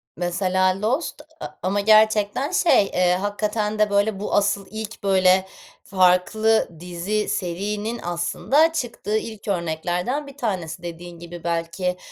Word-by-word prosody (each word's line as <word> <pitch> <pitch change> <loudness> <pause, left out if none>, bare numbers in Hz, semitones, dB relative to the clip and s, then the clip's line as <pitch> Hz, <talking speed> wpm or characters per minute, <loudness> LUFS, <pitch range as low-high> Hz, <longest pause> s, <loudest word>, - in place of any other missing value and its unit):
Mesela 185 +2 0
Lost 265 +8 -1 0.2
a - - -5 0.2
ama 195 +3 0
gerçekten, 215 - +3
şey, 350 - +4
eee, 180 -2 +2
hakikaten 210 +2 -2
de, 215 -1 +3
böyle, 200 0 +1
bu 205 - -4
asıl 200 -1 +1
ilk, 220 0 -7
böyle, 190 -1 +4 0.4
farklı 190 +4 +3
dizi, 180 +5 -2
serinin 205 +6 -3
aslında 175 - +1
çıktığı 235 -7 -2
ilk 220 -1 -7
örneklerden 180 - -2
bir 280 0 -12
tanesi. 180 - -3
Dediğin 170 0 -8
gibi 175 0 -10
belki, 170 +2 -2
200 Hz, 130 wpm, -23 LUFS, 180-215 Hz, 0.4 s, şey